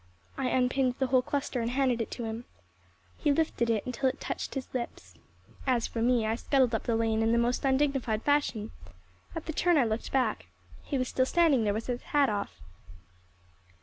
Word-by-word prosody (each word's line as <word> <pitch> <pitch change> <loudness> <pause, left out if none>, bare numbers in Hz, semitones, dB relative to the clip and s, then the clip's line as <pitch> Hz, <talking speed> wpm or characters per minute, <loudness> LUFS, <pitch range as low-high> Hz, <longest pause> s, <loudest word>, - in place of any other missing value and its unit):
I 265 - -1
unpinned 255 0 +1
the 265 - +1
whole 255 0 +3
cluster 275 -2 -2
and 230 - -1
handed 255 -2 +1
it 225 - -3
to 240 - -5
him. 225 +1 -5 0.7
He 295 - +1
lifted 280 -6 +1
it 220 -3 +1
until 255 +1 0
it - - -7
touched - - -4
his 270 - -3
lips. 245 -2 -5 0.5
As 245 -3 +2
for 230 - -4
me, 240 -1 +3
I 220 - +1
scuttled 255 +1 +2
up 225 - -1
the 230 - +1
lane 225 -1 +1
in 225 0 +2
the 235 - +3
most 240 +1 +1
undignified 265 -5 +1
fashion. 285 -7 +1 0.6
At 325 - -5
the 320 - -4
turn 350 +2 +3
I 275 - +5
looked 220 +1 -3
back. 265 -2 0 0.3
He 280 - -3
was 255 -1 0
still 260 +1 +1
standing 310 -10 +3
there 205 - +2
with 225 - -3
his 245 -1 -3
hat 285 -3 +2
off. 205 -1 -3
250 Hz, 200 wpm, -29 LUFS, 230-270 Hz, 0.7 s, I